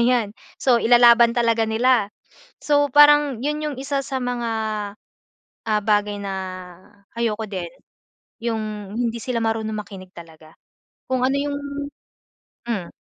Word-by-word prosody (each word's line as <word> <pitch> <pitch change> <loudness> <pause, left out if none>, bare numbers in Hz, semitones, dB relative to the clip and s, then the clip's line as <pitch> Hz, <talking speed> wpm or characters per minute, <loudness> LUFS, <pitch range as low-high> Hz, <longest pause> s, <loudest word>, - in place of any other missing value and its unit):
'yan. 240 -4 +2 0.3
So, 245 -3 +4
ilalaban 235 0 +6
talaga 230 -1 +2
nila. 225 -1 +2 0.5
So, 290 -1 +2
parang 295 -4 +6
'yon 300 +1 -1
'yong 295 -3 -3
isa 275 0 -2
sa 270 - -4
mga, 245 -1 -2 1.2
ah, 215 -1 +1
bagay 210 -1 +1
na 200 - -4 0.9
ayoko 225 -2 -1
din. 185 -4 -5 0.7
'Yong 215 -3 -4
hindi 235 -1 -1
sila 245 -1 -2
marunong 220 -1 -1
makinig 195 -3 -9
talaga, 160 -1 -14 0.5
kung 260 -1 0
ano 265 - +1
'yong 285 0 -2 1.1
hmm. 200 -7 -3
235 Hz, 125 wpm, -22 LUFS, 210-255 Hz, 1.2 s, ilalaban